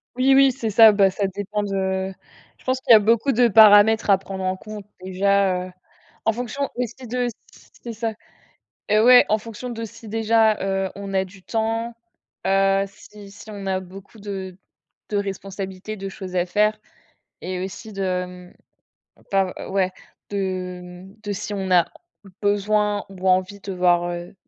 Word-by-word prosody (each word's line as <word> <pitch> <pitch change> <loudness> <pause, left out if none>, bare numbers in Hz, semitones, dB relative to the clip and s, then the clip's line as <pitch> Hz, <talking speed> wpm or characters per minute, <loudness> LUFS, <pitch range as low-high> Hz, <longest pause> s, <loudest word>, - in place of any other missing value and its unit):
Oui, 265 +2 +4
oui, 275 -1 +6
c'est 240 -4 -4
ça, 225 +1 +8
bah 195 -2 +3
ça 200 +1 -1
dépend 205 +2 -3
de 190 -1 -2 0.5
je - - -24
pense 255 0 0
qu'il - - +1
y - - +12
a - - +8
beaucoup 230 +6 +2
de 245 0 +4
paramètres 215 0 +6
à 195 - +6
prendre 190 0 -7
en 185 0 -1
compte 210 -1 -9 0.2
déjà, 190 -1 +1
heu, - - -12 0.5
en 225 - +3
fonction 250 +4 -3
aussi 250 +1 -4
de 245 +1 -1 0.6
c'est 235 - -6
ça. 225 0 -3 0.7
Eh 215 0 +4
ouais, 245 +2 +8
en 215 - +2
fonction 230 +3 -8
de 230 -1 -5
si 225 0 -11
déjà, 220 0 +3
heu, 195 -1 -1
on 200 0 -7
a 190 0 +1
du 190 0 -15
temps, 225 +2 -2 0.5
heu, 195 0 +3
si 200 0 -14
si 215 +2 -12
on 200 -2 -7
a 190 -1 0
beaucoup 195 +4 -13
de 190 -3 -6 0.5
de 205 - -1
responsabilités, 195 +1 -5
de 195 0 -6
choses 190 -1 -8
à 175 0 +1
faire, 210 +3 +1 0.6
et 185 0 -4
aussi 215 +3 -8
de 185 -2 -1
mmh 180 0 -13 0.8
pas 195 -2 +1 0.2
ouais, 190 -1 +1 0.4
de 185 -2 -3 0.2
mmh, 195 +2 -15
de 205 -1 -3
si 205 +2 -5
on 190 -1 -3
a 175 -2 +5 0.6
besoin 205 0 +1
ou 190 -1 -3
envie 185 +2 +1
de 195 - -6
voir, 175 -1 +2
heu 175 +2 -7
200 Hz, 175 wpm, -22 LUFS, 190-220 Hz, 0.8 s, y